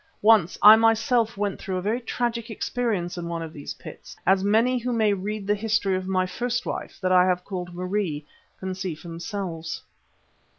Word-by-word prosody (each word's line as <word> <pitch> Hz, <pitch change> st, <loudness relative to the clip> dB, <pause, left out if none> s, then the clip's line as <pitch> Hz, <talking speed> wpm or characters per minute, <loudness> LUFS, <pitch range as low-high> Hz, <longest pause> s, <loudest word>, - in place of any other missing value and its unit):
Once 210 Hz, -5 st, +5 dB
I 210 Hz, +1 st, +11 dB
myself 225 Hz, 0 st, +2 dB
went 205 Hz, -1 st, -2 dB
through 190 Hz, -1 st, -3 dB
a -, -, -2 dB
very 225 Hz, +5 st, 0 dB
tragic 235 Hz, -1 st, -2 dB
experience 210 Hz, -6 st, -2 dB
in 170 Hz, -, -5 dB
one 170 Hz, -1 st, -3 dB
of 160 Hz, -1 st, -8 dB
these 145 Hz, -, -7 dB
pits, -, -, -11 dB
as 190 Hz, +1 st, +4 dB
any 230 Hz, +5 st, +3 dB
who 245 Hz, +1 st, -3 dB
may 220 Hz, -3 st, +2 dB
read 200 Hz, +1 st, -4 dB
the 205 Hz, -, +2 dB
history 210 Hz, -2 st, 0 dB
of 185 Hz, 0 st, -3 dB
my 185 Hz, -1 st, +1 dB
first 240 Hz, +6 st, -2 dB
wife, -, -, -5 dB
that 185 Hz, -1 st, +1 dB
I 180 Hz, -1 st, +6 dB
have 180 Hz, -1 st, 0 dB
called 180 Hz, -3 st, -5 dB
Marie, 180 Hz, -5 st, -2 dB, 0.3 s
can 190 Hz, 0 st, -4 dB
see 185 Hz, -3 st, -4 dB
for 170 Hz, +3 st, -11 dB
themselves. 170 Hz, -2 st, -5 dB
195 Hz, 195 wpm, -25 LUFS, 180-225 Hz, 0.3 s, I